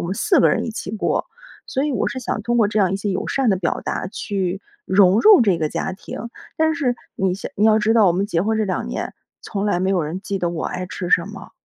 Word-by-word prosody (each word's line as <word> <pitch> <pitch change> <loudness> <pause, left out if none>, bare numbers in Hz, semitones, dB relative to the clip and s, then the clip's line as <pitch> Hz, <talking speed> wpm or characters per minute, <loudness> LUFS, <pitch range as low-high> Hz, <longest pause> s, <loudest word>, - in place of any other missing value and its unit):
我 - - -3
们 190 - -3
4 360 - +3
个 - - +5
人 - - +1
一 - - -3
起 215 - -5
过， 215 0 -1 0.4
所 270 - -1
以 295 - -1
我 - - 0
是 260 - -5
想 220 -3 -3
通 240 +2 0
过 225 - +4
这 210 +1 0
样 190 -1 +2
一 - - 0
些 200 +1 -3
友 185 - -3
善 265 -4 +1
的 190 - +2
表 175 -2 -2
达 - - -3
去 190 -1 -3 0.2
融 190 +2 +4
入 415 - +7
这 195 -6 +2
个 155 -2 0
家 190 - -3
庭。 205 +4 -8 0.3
但 315 0 +2
是 255 -7 0 0.2
你 190 -2 0
想 195 - -7
你 210 - +1
要 220 0 +5
知 220 +1 +2
道， 220 -4 +5
我 170 - +3
们 195 +3 0
结 175 -4 0
婚 220 +1 0
这 215 - +1
2 190 - -3
年， - - -4 0.3
从 200 -2 -3
来 205 -4 +1
没 190 +1 0
有 185 -3 +1
人 160 +5 -4
记 195 -1 -4
得 175 - 0
我 165 -2 -4
爱 180 0 -4
吃 180 0 -5
什 170 -1 +3
么。 195 -2 -10
200 Hz, 290 characters per minute, -21 LUFS, 185-220 Hz, 0.4 s, 入